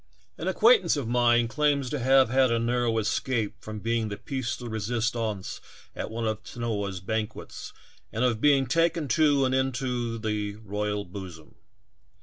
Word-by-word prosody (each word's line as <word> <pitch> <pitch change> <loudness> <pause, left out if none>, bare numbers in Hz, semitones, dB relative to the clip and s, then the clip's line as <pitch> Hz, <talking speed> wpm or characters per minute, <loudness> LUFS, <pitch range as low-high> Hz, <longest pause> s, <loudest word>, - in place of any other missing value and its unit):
An 165 - -5
acquaintance 190 -4 +4
of 135 -5 -3
mine 120 0 +3
claims 140 +2 +1
to 150 - -1
have 130 0 +4
had 130 0 +4
a 115 - +2
narrow 120 0 +1
escape 110 0 0
from 110 0 -7
being 115 -1 0
the 100 - -5
piece 130 -3 -3
de 120 - -7
resistance 110 -2 -2 0.3
at - - -4
one 115 0 -3
of 110 0 -2
Tanoa's 105 -6 -3
banquets, 110 +3 -4 0.4
and 115 - -1
of 120 -3 +1
being 140 -2 +4
taken 165 +2 +1
to 145 +2 +4
and 130 - 0
into 125 -3 -1
the 105 -2 -2
royal 105 -1 -3
bosom. 90 -4 -9
115 Hz, 155 wpm, -27 LUFS, 110-130 Hz, 0.4 s, acquaintance